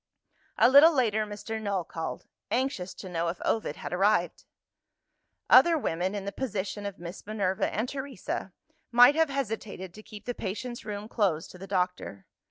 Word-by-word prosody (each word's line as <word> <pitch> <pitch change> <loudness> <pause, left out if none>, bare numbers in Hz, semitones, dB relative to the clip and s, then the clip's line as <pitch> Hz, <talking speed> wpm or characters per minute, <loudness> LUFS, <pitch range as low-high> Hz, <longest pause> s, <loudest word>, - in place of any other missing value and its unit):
A - - +6
little 285 +6 +8
later 220 -7 +1
Mr. 220 +2 -5
Null 200 -4 -1
called 165 0 -6 0.2
anxious 250 -8 -1
to - - -9
know 170 -1 -2
if 170 +1 -3
Ovid 220 -9 0
had - - -6
arrived. 180 -2 +1 1.0
Other 340 -1 +7
women, 185 - -1
in 200 -1 -4
the 200 - -3
position 205 -3 -3
of 200 - -7
Miss 175 +2 -8
Minerva 195 -3 0
and 220 +4 -1
Teresa, 265 -8 -5 0.4
might 245 +3 +8
have 320 0 +2
hesitated 220 -8 -4
to 215 - -11
keep 215 -1 -12
the 245 - -2
patient's 240 +4 -5
room 210 0 -5
closed 190 -8 0
to 180 - -13
the 195 - -8
doctor. 180 - -2
205 Hz, 170 wpm, -28 LUFS, 185-240 Hz, 1.0 s, little